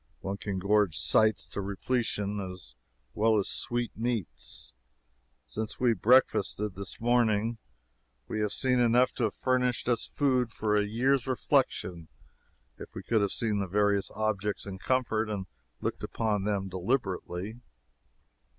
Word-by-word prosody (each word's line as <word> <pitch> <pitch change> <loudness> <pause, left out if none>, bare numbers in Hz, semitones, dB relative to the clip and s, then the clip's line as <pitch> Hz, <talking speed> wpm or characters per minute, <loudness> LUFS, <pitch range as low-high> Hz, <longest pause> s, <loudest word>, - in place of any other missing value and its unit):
One 95 +1 -3
can 100 -2 -4
gorge 100 -2 +2
sights 110 0 +3
to - - -3
repletion 105 0 -1
as 90 -10 -7 0.4
well 110 0 +3
as 100 - +1
sweetmeats. 120 - -2 0.7
Since 110 0 -5
we 125 -2 +4
breakfasted, 105 -2 +3
this 100 +1 -6
morning, 115 -1 +2 0.7
we 110 - -3
have 105 -1 0
seen 125 +1 +2
enough 120 +1 +4
to 120 - 0
have 105 - -2
furnished 125 -2 0
us 120 -2 +1
food 130 -5 +1
for 105 -2 0
a 105 0 +2
year's 130 +4 +1
reflection 90 -9 0 0.7
if - - -10
we 95 - -6
could 110 +3 +2
have 100 - +1
seen 110 -3 0
the 100 - -1
various 100 +1 +2
objects 105 -1 -1
in 95 -1 -7
comfort 115 -3 0
and 100 -3 -3 0.4
looked - - -3
upon 105 -3 -1
them 100 -2 0
deliberately. 95 +1 -2
105 Hz, 140 wpm, -29 LUFS, 100-120 Hz, 0.7 s, we